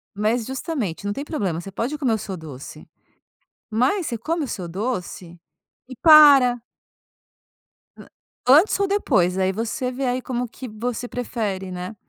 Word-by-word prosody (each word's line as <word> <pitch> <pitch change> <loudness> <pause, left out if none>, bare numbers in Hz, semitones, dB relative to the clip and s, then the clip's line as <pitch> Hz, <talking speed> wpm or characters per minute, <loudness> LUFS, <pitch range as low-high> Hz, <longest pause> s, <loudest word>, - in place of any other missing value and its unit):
Mas, 220 +3 0
justamente, 260 - -4
não 205 - -1
tem 280 +6 -5
problema. 190 - -2
Você 195 - -9
pode 245 +9 -3
comer 250 -6 +1
o - - -1
seu 190 -1 -6
doce, 150 -5 -10 0.8
mas 260 - +1
você 235 - -3
come 320 +7 -2
o - - -4
seu 185 -7 -5
doce 180 -3 -5 0.5
e 255 - -9
para. 280 -6 +7 1.9
Antes 310 +10 +5
ou 395 - +2
depois, 205 - +1
aí 190 0 +1
você 235 +5 -3
vê 265 +2 -3
aí 250 0 -1
como 250 -1 -3
que 255 +3 -9
você 240 +2 -4
prefere, 210 -7 -4
né, 180 +4 -6
235 Hz, 155 wpm, -22 LUFS, 190-265 Hz, 1.9 s, para